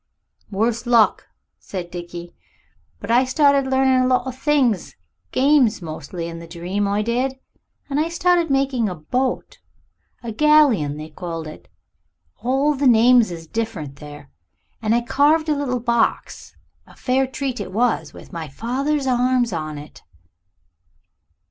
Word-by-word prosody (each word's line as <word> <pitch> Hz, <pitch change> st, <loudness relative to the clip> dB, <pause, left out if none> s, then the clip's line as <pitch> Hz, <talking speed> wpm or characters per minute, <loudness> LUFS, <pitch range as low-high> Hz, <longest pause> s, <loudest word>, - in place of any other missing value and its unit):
"Worse 230 Hz, +4 st, -1 dB
luck," 235 Hz, -3 st, +3 dB, 0.3 s
said 175 Hz, -3 st, -7 dB
Dickie. 175 Hz, 0 st, -8 dB, 0.7 s
"But -, -, -4 dB
I 245 Hz, +2 st, +5 dB
started 275 Hz, 0 st, +3 dB
learning 265 Hz, -1 st, +3 dB
a 255 Hz, -, +2 dB
lot 255 Hz, 0 st, +2 dB
of 260 Hz, -1 st, -5 dB
things 265 Hz, -, +1 dB, 0.4 s
games 270 Hz, -5 st, +3 dB
mostly, 165 Hz, 0 st, -6 dB
in 165 Hz, 0 st, -7 dB
the 170 Hz, -, -10 dB
dream, 180 Hz, +4 st, -3 dB
I 205 Hz, +1 st, 0 dB
did 250 Hz, +4 st, -1 dB, 0.5 s
and 280 Hz, 0 st, -1 dB
I 320 Hz, +2 st, 0 dB
started 345 Hz, -1 st, +2 dB
making 270 Hz, -5 st, +1 dB
a 180 Hz, -, -5 dB
boat 250 Hz, +12 st, -3 dB, 0.6 s
a 235 Hz, -, -4 dB
galleon 260 Hz, -, +3 dB
they 155 Hz, +1 st, -8 dB
called 165 Hz, 0 st, -6 dB
it. 155 Hz, -, -11 dB, 0.7 s
All 270 Hz, +5 st, +1 dB
the 280 Hz, -1 st, +1 dB
names 240 Hz, -1 st, +5 dB
is 165 Hz, -2 st, -8 dB
different 160 Hz, -9 st, -4 dB
there. 145 Hz, -1 st, -12 dB, 0.5 s
And 220 Hz, 0 st, +2 dB
I 240 Hz, -, +2 dB
carved 295 Hz, +6 st, +2 dB
a 300 Hz, -, +2 dB
little 260 Hz, -3 st, -2 dB
box 235 Hz, -1 st, -1 dB, 0.3 s
a -, -, -17 dB
fair 265 Hz, +1 st, 0 dB
treat 260 Hz, -1 st, -4 dB
it -, -, -5 dB
was 230 Hz, +4 st, 0 dB
with -, -, -14 dB
my 165 Hz, -2 st, -5 dB
father's 265 Hz, -, -2 dB
arms 250 Hz, -3 st, +1 dB
on 155 Hz, -2 st, -4 dB
it." 145 Hz, +1 st, -12 dB
240 Hz, 150 wpm, -21 LUFS, 175-265 Hz, 0.7 s, I